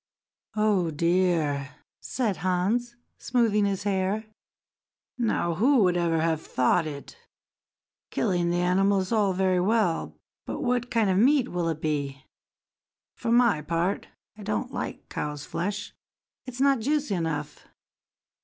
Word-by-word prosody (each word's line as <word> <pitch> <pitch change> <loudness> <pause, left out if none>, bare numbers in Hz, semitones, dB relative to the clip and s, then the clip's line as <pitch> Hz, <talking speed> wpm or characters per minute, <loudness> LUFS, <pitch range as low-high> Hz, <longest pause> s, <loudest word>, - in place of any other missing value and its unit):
"Oh, 210 -5 +2
dear!" 160 -4 +1 0.2
said 225 -7 -2
Hans, 195 +7 0 0.2
smoothing 225 -4 +2
his 195 -1 -1
hair. 200 +2 0 0.9
"Now 215 -7 +1
who 240 - +4
would 180 -1 +3
ever 170 -2 +1
have 160 -1 0
thought 155 +6 +1
it! 145 - -8 0.9
Killing 175 -5 0
the 175 +1 +1
animal 195 +2 +3
is 185 - -5
all 210 -4 +3
very 185 0 +2
well, 195 -3 0 0.3
but - - -4
what 245 -2 0
kind 220 -4 +2
of 185 - +2
meat 260 +2 +4
will 175 -2 -1
it 160 -1 -3
be? 140 -3 -2 0.9
For 230 - -3
my 235 -9 +4
part, 170 +5 -1 0.3
I 215 - -12
don't 215 +5 -3
like - - -5
cow's 150 -1 -4
flesh; 200 +3 -4 0.5
it's 255 0 -7
not 275 -1 +4
juicy 285 0 0
enough. 160 -4 -3
190 Hz, 135 wpm, -26 LUFS, 170-225 Hz, 0.9 s, who